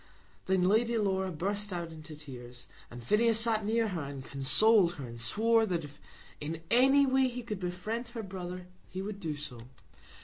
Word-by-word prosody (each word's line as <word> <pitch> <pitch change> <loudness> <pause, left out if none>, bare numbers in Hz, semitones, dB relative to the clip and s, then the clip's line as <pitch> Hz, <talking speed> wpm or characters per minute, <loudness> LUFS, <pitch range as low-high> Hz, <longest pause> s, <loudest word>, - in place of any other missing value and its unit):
Then 190 -1 +2
Lady 225 +5 +3
Laura 190 -3 0
burst 200 +5 -2
out 170 -2 -4
into 155 -1 -10
tears, 125 -5 -10 0.2
and 120 0 -10
Phineas 220 - +3
sat 225 -2 +2
near 225 +1 +1
her, 175 -4 -3
and 140 -2 -7
consoled 175 +7 +4
her, 140 -6 -7
and 115 -1 -8
swore 225 - +3
that 175 -4 -1
if 145 -1 -12 0.4
in 160 +2 -5
any 270 +4 +6
way 265 0 +3
he 245 0 -5
could 210 -4 -5
befriend 185 +7 -4
her 230 -2 -6
brother 180 -2 -6 0.2
he 190 +1 -5
would 200 0 -5
do 160 -6 -3
so. 145 -5 -7
190 Hz, 180 wpm, -31 LUFS, 155-225 Hz, 0.4 s, any